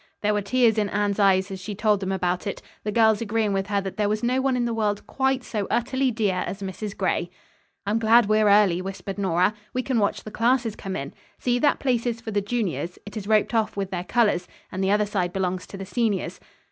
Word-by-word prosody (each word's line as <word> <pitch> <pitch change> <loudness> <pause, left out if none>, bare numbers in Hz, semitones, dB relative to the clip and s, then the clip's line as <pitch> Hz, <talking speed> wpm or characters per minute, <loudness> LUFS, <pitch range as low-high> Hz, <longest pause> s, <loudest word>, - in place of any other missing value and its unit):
There 210 0 +2
were 210 - +1
tears 225 +1 +3
in 205 -1 0
Anne's 205 0 0
eyes 190 -1 +3
as 190 - -5
she 205 +2 -6
told 210 0 +2
them 190 -1 -3
about 180 0 -1
it, 200 - -3 0.2
the 210 - -2
girls 220 -1 +4
agreeing 220 -2 0
with 195 0 -1
her 200 -1 +1
that 195 +1 -6
there 210 -1 +1
was 215 +1 -1
no 255 +2 +2
one 260 -1 +1
in 240 - 0
the 235 - -1
world 210 -2 -1
quite 265 -1 0
so 210 -5 -3
utterly 260 +2 +1
dear 215 -5 0
as 195 +1 -5
Mrs. 195 +2 -5
Gray. 185 -2 0 0.6
"I'm 210 +3 +1
glad 225 +1 +5
we're 215 0 +3
early," 200 -4 +4
whispered 195 +1 -6
Nora. 185 +1 +2 0.2
"We 255 - 0
can 255 -3 0
watch 200 - 0
the 215 - -8
classes 230 0 +1
come 195 -2 -5
in. 140 -5 -5 0.2
See, 245 -1 0
that 290 +3 +3
place 245 -3 0
is 235 -1 -2
for 225 -1 -6
the 205 -1 +1
juniors. 200 -5 -2
It 205 - -10
is 205 -2 -5
roped 215 +1 +2
off 220 -2 0
with 195 -1 -2
their 175 -2 -2
colors 205 -5 +1 0.2
and 190 +1 -2
the 190 - +1
other 210 +1 +3
side 190 -4 -1
belongs 185 -1 -2
to 195 - -9
the 195 - -6
seniors." 215 -1 -1
210 Hz, 240 wpm, -24 LUFS, 195-230 Hz, 0.6 s, glad